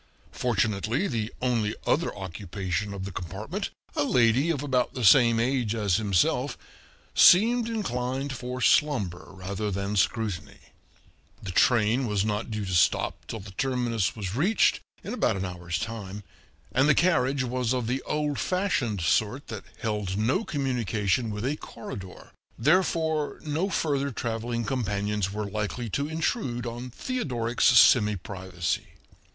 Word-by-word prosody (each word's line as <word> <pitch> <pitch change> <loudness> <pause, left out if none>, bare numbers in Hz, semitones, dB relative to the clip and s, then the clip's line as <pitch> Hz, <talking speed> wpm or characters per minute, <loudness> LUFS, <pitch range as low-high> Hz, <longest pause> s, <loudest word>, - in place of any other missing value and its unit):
Fortunately 110 - 0
the 115 -2 -2
only 115 -4 +1
other 170 - +1
occupation 95 0 -4
of 95 -1 -5
the 100 - -5
compartment, 100 - -5 0.3
a - - +2
lady 125 +2 +3
of 145 -4 -1
about 130 -3 0
the 125 -3 -1
same 115 +1 +6
age 120 -2 0
as 105 -4 +1
himself, 100 -6 +1 0.6
seemed 230 +5 +6
inclined 135 - -2
for 125 0 -5
slumber 110 - +2
rather 100 +2 -4
than 100 +1 -2
scrutiny; 95 -4 -1 0.9
the 95 - -4
train 120 +5 +3
was 105 -2 0
not 105 +1 -2
due 105 -2 -3
to 95 - -3
stop 85 - +1
till 115 - -5
the 100 0 -10
terminus 120 -3 -1
was 100 -4 -4
reached, 180 - +3 0.2
in - - -5
about - - +1
an 95 - -2
hour's 85 -2 -4
time, 105 -3 -5 0.5
and 135 +4 +3
the 145 - +5
carriage 140 -6 +2
was 125 -1 -1
of 125 -2 0
the 125 +4 -1
oId 150 -1 -1
fashioned 150 - 0
sort 110 - 0
that - - -6 0.2
held 105 -4 -2
no 125 - +1
communication 120 - -1
with 105 +2 -4
a 145 +3 -1
corridor, 95 -8 -9 0.3
therefore 160 +1 +1
no 155 +6 -1
further 140 -6 0
traveling 115 -1 -3
companions 105 -5 -1
were 105 +1 -3
likely 105 +3 -3
to 140 +6 -1
intrude 160 - -2
on 120 +2 -5
Theodoric's 125 - -2
semiprivacy. 95 -7 +3
115 Hz, 140 wpm, -27 LUFS, 100-135 Hz, 0.9 s, same